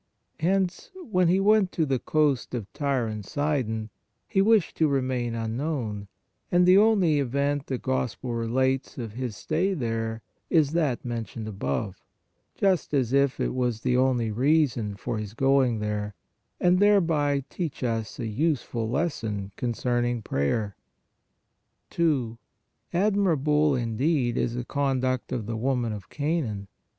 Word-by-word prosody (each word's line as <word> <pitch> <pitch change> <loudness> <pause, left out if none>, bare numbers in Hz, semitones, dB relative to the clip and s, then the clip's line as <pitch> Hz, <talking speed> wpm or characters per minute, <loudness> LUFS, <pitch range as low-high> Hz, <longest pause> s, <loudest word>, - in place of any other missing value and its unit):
Hence, 185 +2 0 0.2
when 185 -3 +3
He 180 +3 +3
went 205 -1 +4
to 160 - +1
the 135 -3 0
coast 145 -5 +1
of 105 -5 -6
Tyre 140 -4 0
and 110 -2 -4
Sidon, 110 -4 -2 0.4
He 195 -3 +2
wished 215 -3 +3
to 160 - +4
remain 130 -4 -1
un 115 -1 -3
known, 120 -8 -3 0.4
and 175 0 +5
the 185 +2 +7
only 195 -9 +4
event 140 +2 0
the 130 - -2
Gospel 125 -1 -2
relates 130 +3 0
of 115 -4 -5
His 120 -3 -4
stay 185 +5 0
there 115 -4 -3 0.3
is 155 -4 +3
that 155 -8 0
mentioned 115 -2 -4
above, 95 -1 -3 0.5
just 185 -6 +1
as 130 -3 +1
if 140 -1 +2
it - - 0
was 125 -3 -1
the 125 - +1
only 125 -3 +2
reason 125 -4 +1
for 115 +2 -4
His 105 0 -6
going 135 -2 +3
there, 105 -1 -3 0.4
and 180 0 +4
thereby 160 -9 +3
teach 165 -7 -5
us 115 -3 -2
a - - -4
useful 120 -2 -1
lesson 110 - -2
concerning 120 -1 -1
prayer. 100 +7 -1 1.2
2. 135 -9 0 0.5
Admirable, 160 -7 +2
indeed, 120 +2 0
is 120 -2 -1
the 120 0 -3
conduct 130 -2 -1
of 115 -4 -2
the 115 +1 -3
woman 120 -2 0
of 100 -4 -8
Canaan! 140 -10 -2
130 Hz, 140 wpm, -26 LUFS, 115-155 Hz, 1.2 s, the